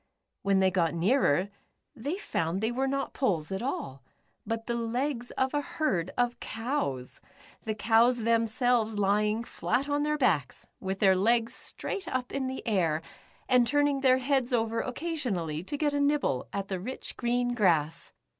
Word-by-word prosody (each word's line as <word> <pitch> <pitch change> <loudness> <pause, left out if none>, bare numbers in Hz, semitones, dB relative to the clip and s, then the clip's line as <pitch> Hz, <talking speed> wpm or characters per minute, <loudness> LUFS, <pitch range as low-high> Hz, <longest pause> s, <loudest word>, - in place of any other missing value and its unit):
When 195 -1 +2
they 190 0 +4
got 170 -3 +1
nearer, 185 - +2 0.5
they 285 +9 -3
found 170 - -2
they 220 +3 0
were 265 +2 0
not 275 0 -2
poles 175 - 0
at 190 - -2
all, 135 - -4 0.5
but 225 0 -2
the 235 - -2
legs 240 +2 -2
of 265 +1 +1
a 290 - +1
herd 300 - -1
of 245 -1 +1
cows, 225 - -3 0.4
the 215 -1 -1
cows 230 +2 +3
themselves 230 0 +2
lying 210 +2 +2
flat 245 +3 -1
on 290 0 0
their 300 0 +1
backs, 160 - 0
with 190 0 -3
their 190 -2 +6
legs 230 +4 +2
straight 400 - -4
up 255 -1 -2
in 270 -1 -2
the 260 0 -5
air, 165 -7 +1 0.4
and 250 -2 +4
turning 290 0 +2
their 260 -1 +5
heads 260 -1 0
over 230 -1 +1
occasionally 235 - -2
to 290 - -4
get 295 0 +1
a 285 - +1
nib 290 +1 +3
ble 130 -2 -1
at 195 -1 -3
the 190 -2 -3
rich, 250 +8 -5
green 245 0 0
grass. 165 -9 +1
235 Hz, 170 wpm, -29 LUFS, 195-265 Hz, 0.5 s, their